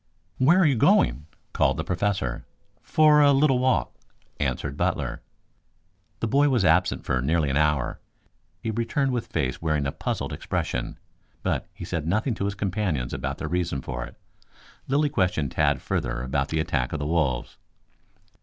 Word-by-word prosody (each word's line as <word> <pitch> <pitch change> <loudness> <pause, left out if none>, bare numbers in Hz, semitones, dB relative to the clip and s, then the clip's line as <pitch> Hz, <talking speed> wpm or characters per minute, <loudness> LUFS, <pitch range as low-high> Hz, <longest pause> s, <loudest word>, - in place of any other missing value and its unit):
"Where 150 +8 +5
are 185 - +5
you 145 - +4
going?" 65 - +3 0.3
called - - +2
the - - -2
Professor. 90 -9 -1 0.4
"For 155 -1 +5
a 145 -1 +6
little 135 -2 +3
walk," 130 0 +1 0.5
answered 70 -1 -2
Butler. - - -1 1.0
The 115 - 0
boy 140 +5 +3
was 120 -8 +2
absent 90 +2 +2
for 65 - 0
nearly 75 +1 +1
an - - -1
hour. 75 -4 +1 0.6
He 115 - -1
returned 125 +5 0
with 120 -2 -2
face - - -2
wearing 75 -3 0
a 70 - -1
puzzled - - -3
expression, - - -3 0.5
but - - -1
he - - -8
said 80 -2 -3
nothing 110 +8 +1
to 100 - -3
his 100 0 -2
companions 95 - -2
about 70 +1 -3
the 80 - -4
reason 85 -5 -2
for 65 -2 -4
it. - - -10 0.7
Lilly 145 +2 +2
questioned 90 - 0
Tad - - +1
further - - -2
about 70 +1 -1
the 80 - -1
attack 65 -5 -1
of 75 - -2
the 75 - -3
wolves. 75 -6 -1
85 Hz, 165 wpm, -25 LUFS, -, 1.0 s, a